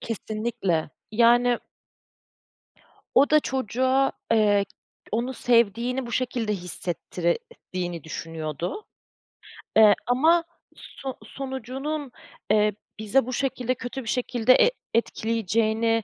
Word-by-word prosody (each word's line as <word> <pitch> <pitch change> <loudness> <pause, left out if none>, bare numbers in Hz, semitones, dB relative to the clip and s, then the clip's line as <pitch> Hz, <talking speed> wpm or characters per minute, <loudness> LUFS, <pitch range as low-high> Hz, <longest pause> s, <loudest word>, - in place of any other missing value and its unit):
Kesinlikle, 215 -7 -2 0.2
yani 240 +2 +4 1.6
o 280 +3 +5
da 305 - +6
çocuğa, 260 +1 +1 0.2
eee, 205 -2 +4 0.5
onu 245 +4 -1
sevdiğini 235 +2 +2
bu 235 - -7
şekilde 240 -4 -1
hissettirdiğini 175 -1 -4
düşünüyordu, 165 - -5 0.9
eee, 215 -2 +8
ama 320 +8 +4 0.3
so 265 -1 -8
sonucunun, 270 +2 -5 0.4
eee, 210 -1 +4 0.3
bize 225 +4 +2
bu 255 - -4
şekilde, 255 -1 -1
kötü 255 +2 -6
bir 225 - -6
şekilde 245 0 +3
et - - +4 0.2
etkileyeceğini 225 0 +1
235 Hz, 95 wpm, -25 LUFS, 210-260 Hz, 1.6 s, eee